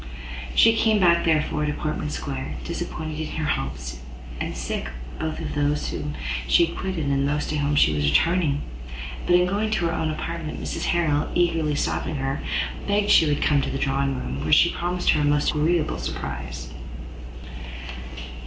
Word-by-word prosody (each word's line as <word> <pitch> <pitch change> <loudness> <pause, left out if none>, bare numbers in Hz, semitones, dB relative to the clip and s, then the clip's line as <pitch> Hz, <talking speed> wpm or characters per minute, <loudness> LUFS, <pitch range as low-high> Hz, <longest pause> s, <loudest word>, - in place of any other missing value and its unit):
She 225 - +7
came 220 -1 +3
back, 170 -2 +4
therefore, 150 -1 +2
to 150 - 0
Portman 150 0 -2
Square, 70 - -4
disappointed 155 - -4
in 155 - -2
her 160 - -1
hopes, 65 - -3 0.4
and - - -3
sick - - -3 0.3
both 160 0 -2
of - - -4
those 145 0 0
whom 75 - -4 0.3
she 170 - +6
quitted 170 -1 -3
and 140 -1 +1
of 140 - +2
those 150 0 0
to 155 - -1
whom 145 +1 +1
she 75 - +5
was 75 -1 +2
returning; 160 - +2 0.6
but 175 - +5
in 180 0 +5
going 205 +4 0
to 215 -5 +1
her 165 - +1
own 160 -1 0
apartment 160 0 -4
Mrs - - -3
Harrel, 155 -4 +1
eagerly 165 -4 +2
stopping 155 +2 -1
her, 135 0 -2 0.5
begged 205 0 +2
she 160 - +7
would 145 -1 +1
come 145 - +3
into 140 - +1
the - - -2
drawing 135 0 0
room, 70 - -4
where 80 - -1
she 170 - +6
promised 175 +1 +1
her 150 - +2
a - - +1
most 145 0 +3
agreeable 155 +1 +1
surprise. 65 0 -5
150 Hz, 180 wpm, -24 LUFS, 140-170 Hz, 0.6 s, She